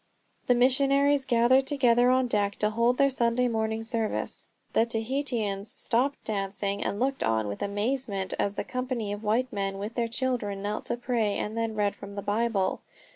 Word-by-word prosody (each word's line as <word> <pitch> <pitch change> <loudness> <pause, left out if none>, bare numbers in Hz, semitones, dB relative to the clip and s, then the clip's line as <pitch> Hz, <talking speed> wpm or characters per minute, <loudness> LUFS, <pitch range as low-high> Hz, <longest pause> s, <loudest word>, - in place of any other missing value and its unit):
The 245 - +5
missionaries 275 +2 +3
gathered 250 +3 +4
together 245 -4 +4
on 255 0 +3
deck 205 -4 0
to 210 0 0
hold 235 +3 +2
their 275 - +5
Sunday 245 0 +1
morning 220 -1 -1
service. 225 -1 -3 0.3
The 225 - +3
Tahitians 225 -4 -2
stopped 265 +5 0
dancing 200 -1 -2
and 200 - -2
looked 270 +2 0
on 110 -1 +1
with 100 - -5
amazement, 205 -1 -1
as 200 0 0
the - - -2
company 250 -5 -3
of 205 - -6
white 235 +4 0
men 195 -1 -2
with 205 +3 -5
their 235 -1 0
children 230 -5 -2
knelt 210 +1 -3
to - - -1
pray 235 -4 0
and 215 - -3
then 225 -1 -2
read 205 -1 0
from 200 0 -10
the 200 - -5
Bible. 205 -3 0
230 Hz, 180 wpm, -27 LUFS, 205-250 Hz, 0.3 s, The